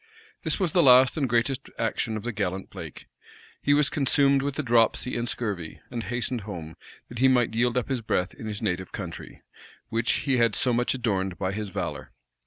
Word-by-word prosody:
This - - 0
was 180 -5 +1
the 175 - +4
last 130 -2 +7
and 140 -5 0
greatest 120 +3 0
action 110 -1 -1
of 105 - -7
the 120 - -2
gallant 95 -3 -3
Blake. - - -9 0.6
He 145 - +3
was 145 -1 +4
consumed 140 -1 +3
with 140 0 -3
a 150 - -1
dropsy 120 0 +2
and 120 0 -1
scurvy, 100 -9 -4
and 120 -2 -3
hastened 120 +1 -2
home, 85 -6 -7 0.3
that 120 - -8
he 130 - +5
might 125 -3 +3
yield 120 +2 +1
up 125 - 0
his 130 -3 -1
breath 90 -4 -1
in 110 - -8
his 105 +1 -5
native 95 -3 -2
country, - - -8 0.5
which 115 +1 +1
he 135 -3 +2
had 115 -3 +3
so 125 - +2
much 120 +2 +1
adorned 95 -7 -1
by 95 -1 -1
his 105 0 -4
valor. - - -5
120 Hz, 200 wpm, -26 LUFS, 105-130 Hz, 0.6 s, last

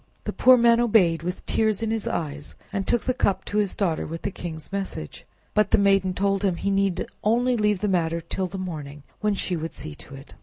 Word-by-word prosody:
The - - -4
poor 255 0 +6
man 235 0 +5
obeyed 195 -9 +3
with 180 +2 -5
tears 220 -1 +1
in 220 - 0
his 225 -2 -2
eyes, 150 -2 -4 0.2
and 195 -2 -2
took 240 - +2
the 255 - 0
cup 200 -5 0
to 210 - -1
his 205 -2 0
daughter 175 -6 0
with 165 +1 -6
the 200 - -2
king's 160 -3 -7
message. 195 - -5 0.3
But 210 -1 +3
the - - +4
maiden 195 -2 +3
told 195 0 +1
him 190 -3 +2
he 200 +3 -1
need 195 -2 +1 0.2
only 245 +4 +2
leave 210 -4 +1
the 210 - +1
matter 170 -3 +1
till 175 +3 -3
the 195 - -7
morning, 150 -6 -6 0.2
when 210 -1 +1
she 185 -1 -1
would 165 0 -4
see 75 - -7
to 135 - -12
it. 135 +1 -13
195 Hz, 230 wpm, -25 LUFS, 165-210 Hz, 0.3 s, poor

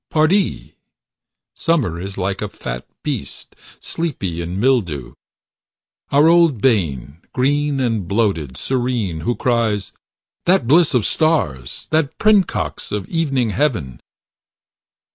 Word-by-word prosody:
Pardie! 170 +5 +1 0.8
Summer 130 - 0
is 95 +1 -6
like 95 0 -2
a 105 - -3
fat - - -6 0.2
beast, 70 - -5 0.2
sleepy 100 - -3
in 85 +3 -4
mildew. 90 - 0 1.0
Our 145 +3 +5
old 165 -7 +4
bane, 80 - 0
green 145 +2 +1
and 115 -8 -1
bloated, 95 - 0
serene, 120 -10 -1
who 120 +9 -1
cries, 115 -5 0 0.6
"That 180 -8 +4
bliss 155 +3 +4
of 120 - +2
stars, 75 - 0
that 155 -3 +1
princox 210 -3 +1
of 105 -2 -3
evening 135 -9 0
heaven!" 105 - -1
115 Hz, 110 wpm, -19 LUFS, 90-145 Hz, 1.0 s, Our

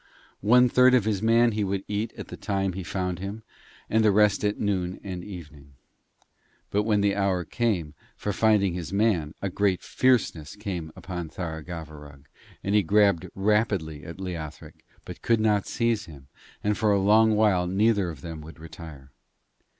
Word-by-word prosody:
One 125 +5 +5
third 125 +1 +5
of 120 -5 +2
his 105 -3 0
man 115 +1 +4
he 105 -1 -1
would 95 0 -2
eat 105 +2 -2
at - - -8
the - - -7
time 95 -2 -2
he 95 - -5
found 90 +2 -3
him, 100 +3 -6 0.4
and 110 +1 +2
the 110 - +5
rest 105 0 +3
at 105 0 0
noon 95 -3 -1
and 90 -3 -6
evening. 75 -8 -11 1.0
But 105 +1 +1
when 105 -2 +2
the 100 -1 +2
hour 95 -3 0
came 95 -11 -1 0.2
for 105 - -3
finding 105 -4 +3
his 85 -1 -5
man 100 -7 +1
a 100 - 0
great 100 -1 0
fierceness 115 -12 +1
came 95 -7 -5
on 90 -2 -6
Tharagavverug, 75 -4 -8 0.4
and 100 - -1
he 105 - +5
grabbed 100 -2 +2
rapidly 95 -7 0
at 85 +1 -9
Leothric, 85 -5 -7 0.2
but - - -9
could 115 -1 +2
not 105 -2 +1
seize 115 -3 0
him, 70 -5 -14 0.3
and 105 0 +1
for 110 -1 +2
a 100 - +3
long 110 +2 +4
while 100 -5 +3
neither 100 0 +2
of 75 -5 -9
them 80 0 -7
would 80 +2 -12
retire. 80 -5 -11
95 Hz, 175 wpm, -26 LUFS, 85-105 Hz, 1.0 s, One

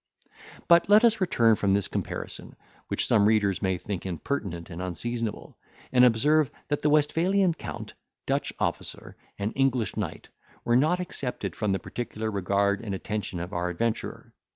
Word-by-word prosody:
But 170 +2 +5
let 210 +2 +7
us 225 -2 +3
return 115 -11 +4
from 100 -2 +1
this 100 -1 +2
comparison, - - -5 0.3
which - - 0
some 105 -3 +4
readers 105 -4 +2
may 95 -2 +1
think 95 0 -5
impertinent 90 - -4
and 85 +2 -6
unseasonable, 110 +5 -4 0.3
and 125 -1 +5
observe, 140 +5 +4 0.2
that 145 - 0
the 150 - +2
Westphalian 170 +5 +3
count, - - -7 0.3
Dutch - - 0
officer, - - -3 0.2
and 100 +2 -2
English 130 -4 +1
knight, 100 -7 -5 0.4
were 120 - +3
not 155 +8 +3
excepted 140 -8 -4
from 105 -3 -1
the 95 - +2
particular 110 0 -4
regard 100 0 +1
and 105 -4 -4
attention 100 -2 -4
of 90 +2 -6
our 90 0 -1
adventurer. 115 +6 -3
110 Hz, 155 wpm, -27 LUFS, 100-145 Hz, 0.4 s, let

